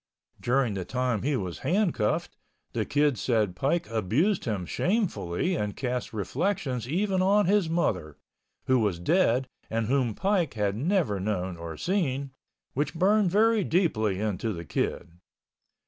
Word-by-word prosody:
During 125 -2 +1
the 95 -2 -3
time 125 0 -1
he 145 +1 0
was 90 -5 -4
handcuffed, 175 - 0 0.4
the - - -1
Kid 145 -4 +2
said 110 -7 +1
Pike 155 - 0
abused 115 - +1
him 105 -6 -2
shamefully 180 - 0
and 105 -8 -3
cast 125 -2 -2
reflections 125 - -2
even 190 +3 +1
on 200 +2 +4
his 195 -2 +2
mother, 90 - -1 0.5
who 130 -1 +3
was 105 -6 +1
dead 130 - +2 0.2
and 115 0 0
whom 125 -2 +1
Pike 190 - 0
had 100 -2 0
never 150 - +1
known 95 -2 -2
or 85 -2 -7
seen, 140 -8 -1 0.4
which 145 +5 -1
burned 195 +3 +3
very 220 +3 +3
deeply 110 - +1
into 105 +1 -1
the 85 -4 -6
Kid. 85 +3 -3
130 Hz, 145 wpm, -27 LUFS, -, 0.5 s, on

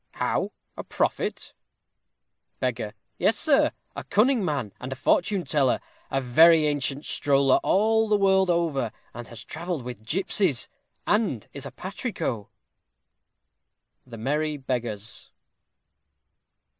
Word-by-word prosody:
_ - - -53 0.2
How, - - 0 0.2
a - - -6
prophet? - - -2 1.1
Beggar. 115 -4 -2 0.2
Yes, 225 - +3
sir; 300 -4 +4 0.2
a - - -5
cunning 225 +3 +3
man, 140 - -2
and 130 +1 -6
a - - -3
fortune 180 +7 +1
teller; 140 -3 +2 0.3
a 135 - 0
very 155 +5 +6
ancient 145 -1 -1
stroller 140 -2 +3
all 220 +2 +2
the 210 - +4
world 190 -1 +3
over, 160 -9 0 0.2
and 120 -1 -8
has 115 - -9
travelled 165 -3 -4
with 120 -3 -8
gipsies: 175 - +1 0.4
and 205 - 0
is 140 -1 -6
a - - -9
patrico. 185 - -4 1.6
_The 115 - -8
Merry 150 +5 -1
Beggars. 120 -5 -4
145 Hz, 120 wpm, -26 LUFS, 125-190 Hz, 1.6 s, very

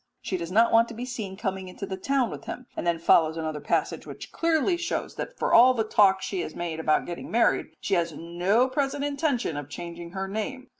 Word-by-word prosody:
She 190 - -3
does 170 -1 -4
not 230 +4 +4
want 230 +1 +5
to 230 - -9
be 240 +2 -5
seen 215 -6 -5
coming 190 -3 -3
into 185 +2 -7
the 190 -1 -4
town 255 +5 0
with - - -8
him; 250 - -6
and - - -3
then 170 -1 +2
follows 165 -1 +4
another 155 -2 -3
passage - - -1
which - - -9
clearly 330 +1 +2
shows 345 0 -3
that - - -6
for - - 0
all 255 +2 +7
the 225 - +1
talk 195 -3 +4
she 190 - -3
has 155 - -6
made 170 -2 -4
about 155 -1 +2
getting 175 -1 -6
married 230 +1 +2
she 200 - -2
has 170 -2 +2
no 175 - +1
present 275 +1 -1
intention 280 - -1
of 145 -1 -6
changing 170 +2 -7
her 195 0 -3
name. 235 +6 -4
195 Hz, 230 wpm, -26 LUFS, 170-250 Hz, -, all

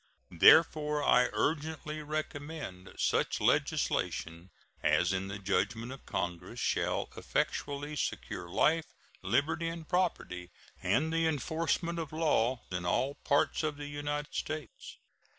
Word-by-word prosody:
Therefore 150 - +6
I 125 -2 +5
urgently 155 0 -1
recommend 150 - -5
such - - +1
legislation 85 +3 0 0.3
as 80 +5 +3
in 95 +1 -1
the 100 0 -5
judgment 100 +4 -1
of 135 - -10
Congress 90 +6 -3
shall - - 0
effectually 145 +1 -2
secure 85 -9 -3
life, 160 - +2 0.3
liberty, 160 +3 +1
and 165 -1 -5
property 165 - -1 0.3
and 160 +3 +1
the 165 0 +2
enforcement 165 +3 -1
of 160 -3 -4
law 130 -6 +1
in 90 -1 -2
all 130 +10 +1
parts 145 0 +1
of 155 -2 -2
the 145 - -6
United 145 0 -4
States. 155 -1 -5
145 Hz, 120 wpm, -31 LUFS, 100-155 Hz, 0.3 s, Therefore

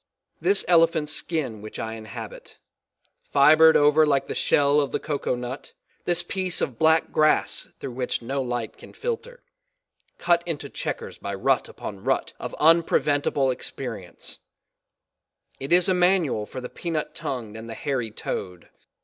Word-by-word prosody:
This 400 +2 +2
elephant 165 -3 +4
skin 140 -11 -2
which 110 - -9
I 110 0 -4
inhabit, 110 -2 -9 0.7
fibred 155 +3 +7
over 150 +1 +5
like 140 -3 +2
the - - -4
shell 145 +1 +3
of 140 - -2
the - - -1
coco 145 -4 -2
nut, 125 +2 -7 0.3
this 175 -1 +1
piece 185 0 -2
of 120 -4 -2
black 160 0 +3
glass 155 0 +2
through - - -5
which 125 +1 -2
no 135 +4 -3
light 120 -3 -4
can - - -13
filter 485 +1 -5 0.7
cut 170 -1 +2
into 145 -4 -4
checkers - - -5
by 100 - -4
rut 130 +6 +1
upon 100 -1 -8
rut 135 +2 0
of - - -6
unpreventable 145 -4 +3
experience 115 -9 -6 1.2
it 135 +3 -5
is 180 0 +5
a 190 - +3
manual 180 - +2
for 130 - -7
the 125 - -5
peanut 160 +2 -4
tongued 115 -5 -5
and 110 +1 -8
the 115 - -6
hairy 125 -4 -2
toed. 90 -4 -6
140 Hz, 150 wpm, -25 LUFS, 120-165 Hz, 1.2 s, fibred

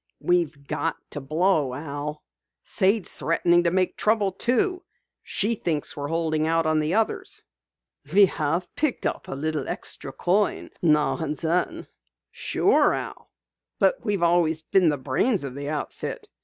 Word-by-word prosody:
"We've 165 -5 0
got 165 - -2
to 145 - -3
blow, 155 -2 +1
Al. 150 +1 -5 0.4
Sade's 195 +1 +2
threatening 175 +1 +2
to - - +4
make 185 +1 0
trouble, 210 -2 +2
too. 255 - 0 0.4
She 215 +4 +1
thinks 165 -8 -2
we're 145 -1 -4
holding 160 -1 0
out 165 0 +2
on 155 0 +2
the 155 +4 0
others." 225 0 -1 0.7
"We 200 +3 +7
have 170 +1 -2
picked 305 -4 -1
up - - -2
a - - -5
little 150 0 -2
extra 135 - -4
coin 190 +7 0
now 150 -3 +3
and 155 -2 -3
then." 170 +3 -1 0.5
"Sure, - - +2
Al, - - -7 0.5
but - - +2
we've 205 -5 0
always 165 -2 +2
been 180 0 +3
the 145 - 0
brains 145 - +1
of 135 -2 -5
the 140 +1 -5
outfit. 150 -1 -5
165 Hz, 150 wpm, -25 LUFS, 150-190 Hz, 0.7 s, We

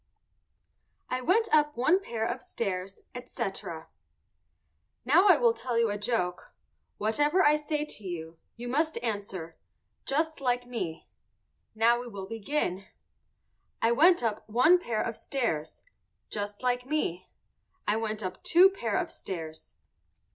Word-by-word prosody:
"I 255 0 -1
WENT 410 - +3
UP 295 -2 +4
ONE 310 +10 +4
PAIR 230 - -3
OF 240 +2 -3
STAIRS," 195 -3 -4
ETC. 195 -9 -5 1.2
Now 335 +10 +5
I - - +7
will 475 -2 +4
tell 250 - -3
you 230 -2 +3
a 205 - -2
joke; 205 -5 -2 0.4
whatever 295 - +2
I 295 +1 +6
say 300 0 -2
to 215 - -7
you, 165 -3 -6 0.2
you 240 +1 -7
must 310 +4 +1
answer 195 -7 -4 0.5
"Just 315 +2 0
like 245 -1 +1
me." 230 -10 -5 0.7
Now 235 +2 +4
we 245 - -7
will 200 -4 -7
begin. 200 -3 -2 0.9
I 230 - +3
went 325 +4 +5
up 220 -1 -2
one 255 +11 +5
pair 230 -10 -1
of 230 - -3
stairs. 165 - -3 0.5
Just 205 +2 -5
like 250 0 0
me. 185 - -2 0.6
I 210 - +3
went 220 -1 -2
up 185 0 -5
two 370 +3 +6
pair 230 - -2
of - - -1
stairs. 160 -4 -7
235 Hz, 140 wpm, -29 LUFS, 200-295 Hz, 1.2 s, I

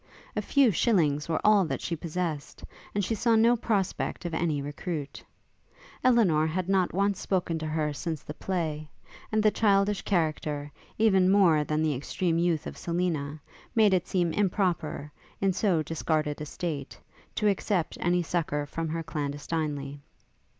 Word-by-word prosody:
A - - 0
few 275 -5 +4
shillings 160 - +2
were 160 - +1
all 210 -2 +6
that - - -3
she 170 - -3
possessed; 160 -2 -4 0.3
and 205 -2 +1
she 225 - -1
saw 230 +1 +2
no 230 +2 +5
prospect 205 -5 -1
of 170 - -3
any 160 -3 0
recruit. 145 +1 -5 0.8
Elinor 195 -12 +4
had 180 +3 -2
not 190 -2 +2
once 200 +1 +1
spoken 175 -4 -1
to 155 - -4
her 155 -1 -1
since 160 +1 -4
the 150 - -7
play; 155 -4 -3 0.4
and 215 -1 +2
the 215 - +5
childish 200 -1 +2
character, 150 -5 -1 0.3
even 195 -4 +4
more 180 -6 +5
than 155 +1 0
the 155 -2 +1
extreme 165 +5 -1
youth 170 -3 +1
of - - -7
Selina, 165 -4 -2 0.4
made 215 -3 +5
it 185 - +1
seem 175 -3 0
improper, 180 -7 0 0.3
in 195 -1 +2
so 180 -5 +1
discarded 155 -1 -1
a 150 - -4
state, 145 -4 -5 0.4
to 210 - +1
accept 195 -3 0
any 175 0 +2
succour 155 -4 -1
from 165 +3 -4
her 165 +1 -3
clandestinely. 145 -2 -3
170 Hz, 155 wpm, -28 LUFS, 155-195 Hz, 0.8 s, all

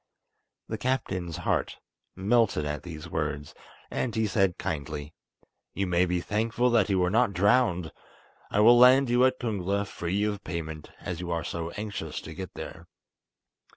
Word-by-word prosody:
The 110 - -4
captain's 95 - -2
heart - - -1 0.4
melted 100 -4 +2
at 75 0 -3
these 80 -2 -8
words, 75 -3 -3 0.4
and 120 -4 -2
he 110 0 +2
said 95 -4 +1
kindly: 75 0 -4 0.6
"You 100 - 0
may 90 0 +2
be 90 0 0
thankful 115 +5 0
that 110 -5 +3
you 95 - +2
were 90 0 +2
not 115 -1 +3
drowned. 95 - +2 0.6
I 105 - +2
will 120 +2 +7
land 130 +1 +7
you 120 +1 +4
at 130 0 +1
Kungla 100 -3 -1
free 95 +1 -2
of 105 -1 -2
payment, 80 -3 -5
as 85 -2 -4
you 90 -1 -5
are 85 -1 -1
so 85 -1 -4
anxious 100 -7 -4
to 80 - -9
get 95 +1 -7
there. - - -8
95 Hz, 160 wpm, -28 LUFS, 85-110 Hz, 0.6 s, will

